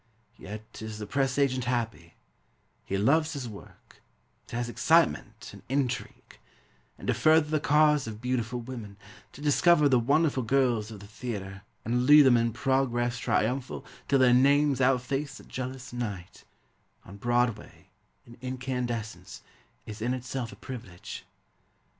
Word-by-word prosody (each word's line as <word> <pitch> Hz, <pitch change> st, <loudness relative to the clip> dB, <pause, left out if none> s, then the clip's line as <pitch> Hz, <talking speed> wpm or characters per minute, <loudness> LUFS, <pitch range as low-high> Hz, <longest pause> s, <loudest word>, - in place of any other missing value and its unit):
Yet 105 Hz, +2 st, -9 dB
is 110 Hz, -1 st, -6 dB
the 105 Hz, -, -5 dB
press 135 Hz, +4 st, 0 dB
agent 130 Hz, -3 st, +1 dB
happy; 115 Hz, -8 st, -3 dB, 0.7 s
He 100 Hz, -, -2 dB
loves 155 Hz, -, +2 dB
his 135 Hz, -4 st, -5 dB
work; 105 Hz, -3 st, -14 dB, 0.5 s
It -, -, -15 dB
has 120 Hz, 0 st, -2 dB
excitement 160 Hz, -, +1 dB
and -, -, -12 dB
intrigue; 130 Hz, -2 st, -3 dB, 0.6 s
And -, -, -10 dB
to -, -, +3 dB
further 155 Hz, -1 st, +3 dB
the 155 Hz, -, +2 dB
cause 150 Hz, -2 st, +3 dB
of 110 Hz, -1 st, -7 dB
beautiful 125 Hz, -1 st, -2 dB
women, 115 Hz, -5 st, -8 dB, 0.4 s
To 145 Hz, -, -12 dB
discover 150 Hz, +1 st, +4 dB
the 130 Hz, -3 st, +4 dB
wonderful 140 Hz, +3 st, +2 dB
girls 120 Hz, -3 st, +1 dB
of 105 Hz, -3 st, -10 dB
the -, -, -10 dB
theatre, 100 Hz, -3 st, -6 dB, 0.2 s
And 125 Hz, +2 st, 0 dB
lead 150 Hz, 0 st, +9 dB
them 130 Hz, -3 st, +6 dB
in 115 Hz, 0 st, +2 dB
progress 120 Hz, -1 st, 0 dB
triumphal 125 Hz, +2 st, -1 dB, 0.2 s
Till 140 Hz, -, +3 dB
their 130 Hz, -2 st, +5 dB
names 140 Hz, +2 st, +4 dB
outface 135 Hz, +2 st, 0 dB
the -, -, -13 dB
jealous 130 Hz, -1 st, -6 dB
night, 100 Hz, -7 st, -6 dB, 0.6 s
On 100 Hz, -, -11 dB
Broadway, 115 Hz, -5 st, -1 dB, 0.3 s
in 120 Hz, 0 st, -15 dB
incandescents, 125 Hz, -3 st, -4 dB, 0.4 s
Is 105 Hz, 0 st, -8 dB
in 125 Hz, +3 st, 0 dB
itself 130 Hz, -1 st, -5 dB
a -, -, -11 dB
privilege. 110 Hz, -5 st, -9 dB
125 Hz, 145 wpm, -28 LUFS, 110-135 Hz, 0.7 s, lead